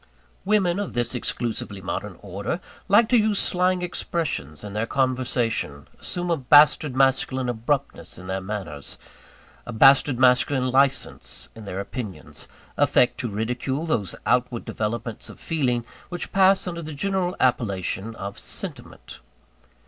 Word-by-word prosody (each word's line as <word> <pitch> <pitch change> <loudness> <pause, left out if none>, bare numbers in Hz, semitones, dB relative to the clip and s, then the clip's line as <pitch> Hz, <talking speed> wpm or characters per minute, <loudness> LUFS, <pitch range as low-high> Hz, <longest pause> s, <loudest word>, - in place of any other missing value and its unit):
Women 195 -3 +2
of 205 - -4
this 120 0 0
exclusively 115 -4 -2
modern 95 +1 -5
order, 100 - -3 0.3
like 215 +3 +5
to 250 - +5
use 215 -1 +1
slang 180 0 +1
expressions 160 - -3
in 105 -1 -7
their 110 +2 -1
conversation; 125 - -1
assume 175 0 -3
a 165 - +2
bastard 145 +1 +5
masculine 130 -1 +2
abruptness 125 +4 -2
in 90 - -10
their 95 +1 -3
manners, 95 -8 -6 0.7
a - - -7
bastard 135 +3 +5
masculine 130 +1 +3
licence 130 - 0
in 110 -1 -11
their 95 -1 -4
opinions; 100 - -7 0.3
affect 125 - +3
to 125 -4 -2
ridicule 125 +8 -2
those 105 - -1
outward 125 -1 +1
developments 110 +1 -4
of - - -12
feeling 125 -7 0 0.2
which 175 0 -5
pass 195 0 +4
under 170 -2 -4
the 155 -2 -7
general 185 +3 -1
appellation 110 -3 0
of 100 -1 -6
"sentiment." - - -6
125 Hz, 135 wpm, -24 LUFS, 105-155 Hz, 0.7 s, like